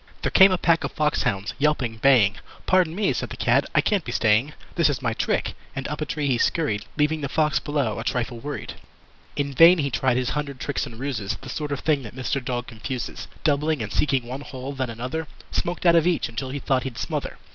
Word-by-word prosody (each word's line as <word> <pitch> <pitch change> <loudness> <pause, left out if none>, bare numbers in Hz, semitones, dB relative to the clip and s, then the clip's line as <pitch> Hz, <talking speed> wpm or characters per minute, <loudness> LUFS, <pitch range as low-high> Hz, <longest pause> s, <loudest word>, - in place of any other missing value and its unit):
There - - 0
came 190 0 +8
a 185 - +2
pack 165 -2 +2
of - - -2
fox 150 -1 +1
hounds 100 +2 -1
yelping, 135 -6 +1
baying. 115 -5 +4 0.3
"Pardon 180 -3 +3
me", 205 +1 +1
said - - -3
the - - -8
Cat. - - +3
"I - - +6
can't 200 -5 +1
be 120 - -5
staying. 115 +5 +2 0.2
This 170 -3 +3
is 145 - -1
my 115 -2 +1
trick." - - -1 0.2
And 135 0 -3
up 150 +1 -4
a 155 - -2
tree 150 -1 -2
he 130 -4 +1
scurried, 110 -11 0
Leaving 150 +1 +1
the 140 - -3
Fox 150 +2 +2
below 140 -8 -1
a - - -4
trifle 120 0 -2
worried. 145 +4 -5 0.6
In 140 -1 -2
vain 165 +6 +8
he 140 -3 -1
tried 125 +1 +1
his 125 -1 0
hundred 140 -3 -3
tricks 140 0 -2
and 115 -3 -11
ruses 125 -8 -3
(The 135 - -9
sort 150 +2 -4
of 140 - -2
thing 150 -3 +2
that 115 -1 -10
Mr. 130 +1 -2
Dog 125 -1 -2
confuses) 125 +2 -6 0.2
Doubling, 150 -3 +1
and 105 - -6
seeking 135 -4 +1
one 130 +3 -6
hole, 135 -1 -7
then 130 -2 -2
another 130 +8 -4 0.2
Smoked 175 +1 -2
out 170 -1 +6
of 165 0 +4
each 175 -2 +1
until 120 +3 -5
he 140 - -4
thought 135 -2 +1
he'd 125 -2 -6
smother. - - -3
140 Hz, 230 wpm, -24 LUFS, 120-150 Hz, 0.6 s, came